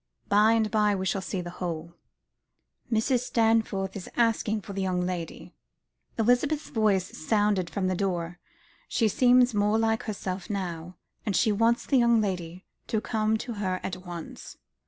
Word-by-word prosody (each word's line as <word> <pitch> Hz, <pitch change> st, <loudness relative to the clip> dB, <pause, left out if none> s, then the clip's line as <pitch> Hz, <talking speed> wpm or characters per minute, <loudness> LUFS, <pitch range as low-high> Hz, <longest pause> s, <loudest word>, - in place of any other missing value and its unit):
By 210 Hz, +2 st, +5 dB
and 220 Hz, -2 st, +1 dB
by 210 Hz, -1 st, +3 dB
we 190 Hz, -1 st, -3 dB
shall 195 Hz, +1 st, 0 dB
see 185 Hz, 0 st, -3 dB
the 175 Hz, 0 st, -7 dB
whole." 170 Hz, -2 st, -5 dB, 1.0 s
"Mrs. 230 Hz, +3 st, +2 dB
Stanforth 220 Hz, -4 st, +1 dB
is 195 Hz, -, -7 dB
asking 225 Hz, -2 st, +1 dB
for 200 Hz, 0 st, -9 dB
the 195 Hz, -, -3 dB
young 180 Hz, -1 st, 0 dB
lady," 175 Hz, -2 st, -5 dB, 0.6 s
Elizabeth's 245 Hz, +7 st, +1 dB
voice 200 Hz, -5 st, +1 dB
sounded 205 Hz, 0 st, +1 dB
from 200 Hz, -2 st, -2 dB
the 185 Hz, -, +1 dB
door. 175 Hz, -2 st, -2 dB, 0.5 s
"She 225 Hz, -, +1 dB
seems 250 Hz, +2 st, +4 dB
more 210 Hz, +1 st, +2 dB
like 225 Hz, 0 st, +1 dB
herself 190 Hz, -4 st, -4 dB
now; 180 Hz, -3 st, -4 dB, 0.3 s
and 205 Hz, -4 st, -1 dB
she 220 Hz, -, +3 dB
wants 230 Hz, +3 st, +2 dB
the 270 Hz, -, +3 dB
young 235 Hz, -1 st, +4 dB
lady 180 Hz, -3 st, -3 dB, 0.2 s
to 220 Hz, -, 0 dB
come 220 Hz, 0 st, 0 dB
to 240 Hz, -, -4 dB
her 185 Hz, -2 st, -1 dB
at 185 Hz, -, -3 dB
once." 175 Hz, -2 st, -9 dB
205 Hz, 160 wpm, -27 LUFS, 185-225 Hz, 1.0 s, By